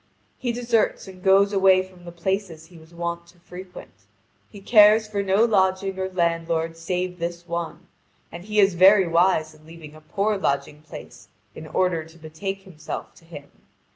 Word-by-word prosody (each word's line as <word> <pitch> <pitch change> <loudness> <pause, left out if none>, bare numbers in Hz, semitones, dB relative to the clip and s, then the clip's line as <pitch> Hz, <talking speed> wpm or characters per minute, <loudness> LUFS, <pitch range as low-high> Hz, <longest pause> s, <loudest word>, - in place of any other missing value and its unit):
He 245 - -2
deserts 235 -3 0
and 185 -1 -12
goes 195 +2 +4
away 190 -1 +4
from 185 -2 -17
the 175 - -8
places 170 -2 -3
he 170 +1 -17
was 160 +1 -18
wont 170 0 -5
to 175 +1 -22
frequent. 180 +1 -11 0.6
He 205 - -12
cares 215 +1 +5
for 205 -1 -2
no 200 +3 +3
lodging 190 -2 0
or 190 0 -2
landlord 165 -2 -1
save 180 +2 -4
this 170 +1 -5
one, 170 0 -5 0.5
and 175 +2 -10
he 210 0 -1
is 195 -2 +4
very 190 +2 +6
wise 165 -2 +2
in 155 0 -20
leaving 160 -1 -13
a 155 - -15
poor 200 +6 -1
lodging 140 -2 -2
place 155 - -12 0.3
in 155 - -10
order 175 -1 0
to 160 +1 -17
betake 180 +5 -6
himself 160 -5 -8
to 165 - -21
him. 145 -4 -12
180 Hz, 175 wpm, -23 LUFS, 165-195 Hz, 0.6 s, very